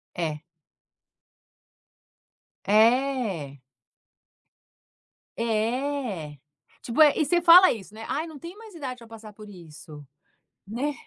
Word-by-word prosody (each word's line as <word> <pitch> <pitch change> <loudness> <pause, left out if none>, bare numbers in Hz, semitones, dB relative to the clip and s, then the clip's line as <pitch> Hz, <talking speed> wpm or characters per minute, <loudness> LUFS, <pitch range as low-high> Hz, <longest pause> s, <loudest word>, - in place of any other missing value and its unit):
É. 155 -3 -3 2.2
É. 215 - +1 1.8
É, 230 - -3 0.5
tipo, 235 +6 -3
é 300 -2 +6
e 310 - +2
você 350 +3 +1
fala 350 +2 +7
isso, 210 -1 -10
né: 225 - -9
"Ai, 320 - -3
não 315 -3 -11
tem 340 +7 -10
mais 440 -3 -14
idade 260 -6 -7
para 230 - -14
passar 225 -1 -12
por 210 0 -14
isso", 155 -5 -13 0.6
né: 260 +8 -3
230 Hz, 110 wpm, -25 LUFS, 195-285 Hz, 2.2 s, fala